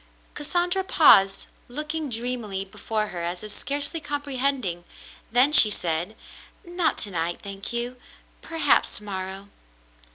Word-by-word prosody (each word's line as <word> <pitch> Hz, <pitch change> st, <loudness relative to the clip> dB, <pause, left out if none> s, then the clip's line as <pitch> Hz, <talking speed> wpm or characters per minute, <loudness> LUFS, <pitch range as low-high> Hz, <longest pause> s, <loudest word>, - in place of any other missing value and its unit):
Cassandra 350 Hz, +5 st, 0 dB
paused, 195 Hz, -, +4 dB, 0.2 s
looking 300 Hz, +3 st, -5 dB
dreamily 230 Hz, -5 st, -3 dB
before 215 Hz, +2 st, -4 dB
her 175 Hz, -, -6 dB
as 175 Hz, +2 st, -4 dB
if 215 Hz, -, -6 dB
scarcely 285 Hz, +8 st, -1 dB
comprehending, 275 Hz, -, -2 dB, 0.5 s
then 250 Hz, +5 st, +4 dB
she 215 Hz, -, +10 dB
said: 175 Hz, +1 st, -2 dB, 0.5 s
"Not 345 Hz, -2 st, 0 dB
to 205 Hz, -, -10 dB
night, 170 Hz, -1 st, -2 dB
thank 195 Hz, 0 st, -6 dB
you. 240 Hz, +1 st, -4 dB, 0.4 s
Perhaps 325 Hz, -4 st, +2 dB
to 210 Hz, -, -10 dB
morrow." 195 Hz, 0 st, -7 dB
235 Hz, 125 wpm, -24 LUFS, 195-290 Hz, 0.5 s, she